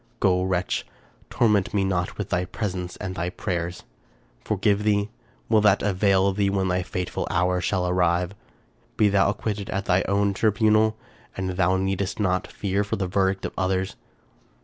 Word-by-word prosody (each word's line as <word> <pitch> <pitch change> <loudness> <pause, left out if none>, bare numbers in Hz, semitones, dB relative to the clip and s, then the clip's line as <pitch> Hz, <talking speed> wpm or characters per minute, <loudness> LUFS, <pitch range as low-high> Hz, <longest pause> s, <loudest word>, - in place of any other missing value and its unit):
Go, 90 -1 +3
wretch! 95 -1 -1 0.5
torment 105 -4 +2
me 100 - +2
not 90 -2 -1
with 105 -2 -4
thy 90 -1 +1
presence 90 -3 -4
and 95 - -5
thy 85 0 -2
prayers. 90 -2 -4 0.3
— - - -35
Forgive 105 0 +1
thee? 105 0 +1 0.4
Will 110 -2 +4
that 105 -1 +4
avail 100 -1 +2
thee 100 0 +1
when 95 -1 0
thy 90 0 +1
fateful 90 0 -3
hour 90 +1 +1
shall 90 -1 0
arrive? 90 0 +1 0.6
Be 105 - +4
thou 100 0 +3
acquitted 105 0 -3
at 100 +1 -2
thy 90 +1 +3
own 100 0 +2
tribunal, 110 +1 +3 0.4
and 95 -1 -2
thou 95 0 +2
needest 95 +1 -2
not 95 -3 0
fear 100 0 -2
the 100 -1 -2
verdict 95 +1 0
of - - -4
others. 95 +1 -1
95 Hz, 165 wpm, -24 LUFS, 90-100 Hz, 0.6 s, Will